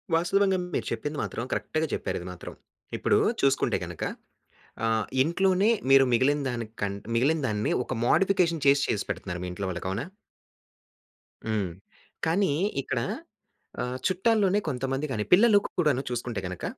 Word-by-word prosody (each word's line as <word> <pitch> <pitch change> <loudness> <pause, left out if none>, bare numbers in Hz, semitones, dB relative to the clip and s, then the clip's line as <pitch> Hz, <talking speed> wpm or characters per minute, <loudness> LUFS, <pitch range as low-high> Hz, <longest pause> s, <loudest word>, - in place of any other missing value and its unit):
వాస్తవంగా 190 +3 +2 0.2
మీరు - - -1
చెప్పింది 145 +7 -3
మాత్రం 115 - -4
కరెక్ట్‌గా 155 0 -1
చెప్పారు 95 - -2
ఇది 90 - -8
మాత్రం. 90 - -9 0.4
ఇప్పుడు - - +2 0.3
చూసుకుంటే 135 0 +2
గనుక - - -7 0.8
ఆహ్, 110 -1 +1 0.2
ఇంట్లోనే 190 +6 +2 0.2
మీరు 135 0 +8
మిగిలిన 140 +5 +3
దానికన్ 110 -4 -4 0.2
మిగిలిన 145 +7 +2
దాన్ని 105 -2 -1
ఒక - - -6
మోడిఫికేషన్ 175 +1 +2
చేసి 140 0 +5
చేసి 105 - 0
పెడుతున్నారు 90 -2 -4
మీ - - -3
ఇంట్లో 95 +2 -4
వాళ్ళకి 90 0 -5
అవునా? 105 +7 -2 1.4
హ్మ్. 105 -5 -1 0.5
కానీ 165 0 +2 0.3
ఇక్కడ - - -2 0.8
ఆహ్, 125 +1 -3
చుట్టాల్లోనే 200 +1 +2
కొంతమంది 135 +1 -2
గాని 105 -5 -1
పిల్లలు 210 +3 +7 0.2
కూడాను 150 -7 +2
చూసుకుంటే 120 -2 -3
గనక, 90 -1 -7
135 Hz, 135 wpm, -27 LUFS, 110-175 Hz, 1.4 s, మీరు